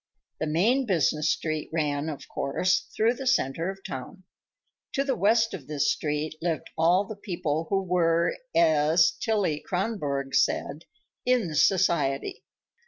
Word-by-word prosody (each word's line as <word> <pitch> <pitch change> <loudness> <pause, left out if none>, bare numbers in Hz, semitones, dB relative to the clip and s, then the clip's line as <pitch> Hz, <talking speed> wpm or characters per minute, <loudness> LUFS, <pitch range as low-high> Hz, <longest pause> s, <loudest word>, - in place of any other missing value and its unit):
The 155 - -1
main 225 - +2
business 155 -5 +1
street 155 -2 -2
ran, 150 -1 -1
of 150 - -7
course, 160 +7 0
through 225 +2 +3
the 260 +1 -6
center 165 - +1
of 195 - -4
the 195 - -26
town. 135 +9 -7 0.7
To 275 - +1
the 270 -2 0
west 225 +4 +2
of 140 - -8
this 150 -2 +1
street 150 +1 -2
lived 165 -2 -2
all 175 +5 +3
the 215 - -7
people 165 -6 -3
who 195 -1 +1
were, 170 -2 +1 0.2
as 160 0 +4
Tillie 200 -9 0
Kronborg 150 -9 -2
said, 140 +3 0 0.4
"in 240 -10 +1
society." 150 -5 +1
165 Hz, 145 wpm, -26 LUFS, 150-195 Hz, 0.7 s, as